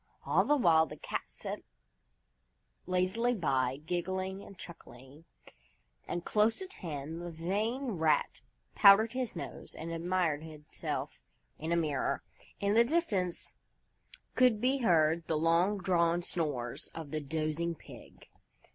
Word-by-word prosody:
All - - +3
the 295 - +3
while 160 - +5
the 150 - -9
Cat - - -3
sat - - -6 1.3
lazily 190 +7 +1
by, 135 - 0
giggling 185 +3 -2
and 195 - -12
chuckling. 145 -3 -12 0.8
And 175 0 -3
close 215 +1 +2
at 380 0 -6
hand 160 -1 -6
the 175 - -5
vain 205 +10 -2
Rat 160 -5 +1 0.3
powdered 205 +3 +7
his 255 -5 -3
nose 175 - -8
and 165 +1 -6
admired 165 -2 0
himself 155 -2 -6 0.4
in 160 +2 -3
a - - +3
mirror. 150 -5 0 0.4
In 200 0 +1
the 230 +2 +6
distance 225 - -1 0.8
could 250 -4 +4
be 260 +4 +2
heard 165 -6 +3
the 160 - +1
long 170 +6 +3
drawn 175 -2 +2
snores 145 -10 -3
of 160 -4 -7
the 155 - -1
dozing 155 +3 -2
Pig. - - -14
170 Hz, 130 wpm, -32 LUFS, 160-200 Hz, 1.3 s, powdered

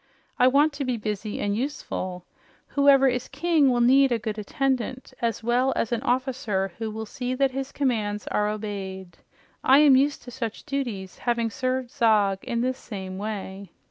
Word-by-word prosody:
I 250 - +6
want 285 +4 +4
to 285 0 -3
be 255 -2 -1
busy 210 -1 -4
and 205 0 0
useful. 185 -8 -4 0.4
Whoever 280 -1 +5
is 250 -1 -1
king 325 -5 +2
will 245 -1 +2
need 265 +2 +5
a 235 - +2
good 215 -1 -4
attendant 260 +3 -2
as 230 -1 -1
well 245 +3 +2
as 230 - -1
an 235 -1 0
officer 245 -7 -1
who 225 -1 -2
will 220 +1 -5
see 255 +2 -4
that 270 0 +2
his 270 +1 -4
commands 215 -7 -1
are 210 0 +1
obeyed. 195 -4 -6 0.4
I 265 - +6
am 290 -2 +7
used 280 +2 +2
to 245 - -10
such 235 -3 -5
duties, 240 -10 -4
having 235 -2 0
served 255 +1 -2
Zog 210 -4 +3
in 235 -3 -2
this 255 +1 -1
same 190 -3 -7
way." 200 -2 -5
240 Hz, 175 wpm, -25 LUFS, 210-265 Hz, 0.4 s, am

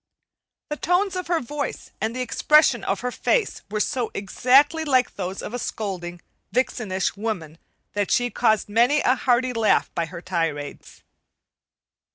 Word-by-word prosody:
The 300 - -3
tones 365 +4 +1
of 365 -1 -4
her 340 -1 +1
voice 290 +2 -5
and 220 +3 -1
the 255 - -1
expression 300 +1 +3
of 195 0 -1
her 250 - -2
face 455 - 0
were 215 +1 -2
so 240 +1 -1
exactly 270 +10 +3
like 260 -4 +2
those 190 0 -5
of - - -6
a 245 - -3
scolding, 180 -7 -5 0.3
vixenish 220 -6 -1
woman 180 -7 -4 0.3
that 205 -1 -1
she 245 0 +2
caused 220 -3 +2
many 240 +8 +3
a 255 - +3
hearty 250 0 +1
laugh 225 -2 +2
by 165 -1 -1
her 170 +1 -8
tirades. 165 -5 -4
235 Hz, 155 wpm, -23 LUFS, 195-265 Hz, 0.3 s, expression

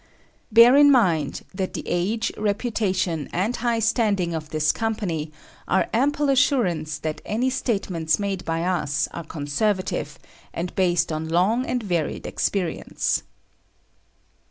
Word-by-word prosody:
Bear 235 +4 +8
in 290 0 +7
mind 170 - +2
that 185 0 -3
the - - -4
age, 200 +6 -1
reputation 200 - -1
and 205 +8 -1
high 235 0 0
standing 215 -6 +1
of 155 -1 -5
this 155 -1 +2
Company 200 -9 -3 0.4
are 190 - +1
ample 290 +5 +1
assurance 185 - +1
that 155 0 -4
any 245 +5 0
statements 195 - 0
made 195 -2 -3
by 165 0 -2
us 170 -6 0
are 170 - -5
conservative, 165 +7 -2 0.4
and 175 +2 -3
based 175 -3 +1
on 155 +1 -3
long 200 +10 +2
and 250 -2 -1
varied 175 -6 -2
experience. 180 -5 -1
190 Hz, 130 wpm, -23 LUFS, 165-225 Hz, 0.4 s, Bear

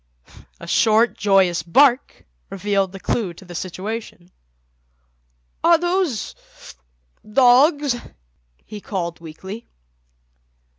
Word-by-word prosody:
A - - -10
short, 220 +6 +2
joyous 190 -4 +2
bark 260 +8 +2 0.2
revealed 195 -1 -1
the 195 - -10
clue 190 -3 -2
to 190 - -15
the 175 - -11
situation. 185 +1 -6 1.3
"Are 335 0 +6
those—dogs?" 255 - 0 0.7
he 210 -1 -9
called 175 -5 -4
weakly. 190 +7 -10
200 Hz, 85 wpm, -21 LUFS, 175-245 Hz, 1.3 s, Are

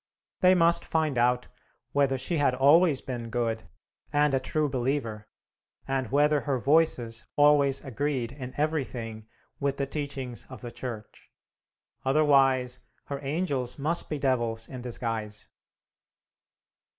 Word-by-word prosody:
They 185 -1 +6
must 170 -1 +4
find 155 -3 0
out 125 +1 +2 0.4
whether 140 -2 +2
she 130 +7 -1
had 140 -3 +2
always 145 +3 +5
been 120 -3 -5
good, 115 -2 -2 0.5
and 145 -1 +3
a 135 - +3
true 150 +3 0
believer, 120 -5 -2 0.6
and 135 -3 -1
whether 145 +1 +3
her 140 -3 -1
Voices 120 -5 +1
always 145 -2 +4
agreed 135 -2 -2
in 130 -2 -8
everything 125 -8 -2 0.3
with 140 -1 -1
the 140 - 0
teachings 135 -4 -5
of 130 - -10
the 120 - -7
Church. 115 -5 -8 0.7
Otherwise 135 -3 +3 0.3
her 140 -1 -3
angels 140 -4 -2
must 155 +4 -1
be 150 - -2
devils 120 -5 0
in 130 -2 -8
disguise. 115 -3 -4
135 Hz, 125 wpm, -27 LUFS, 120-145 Hz, 0.7 s, They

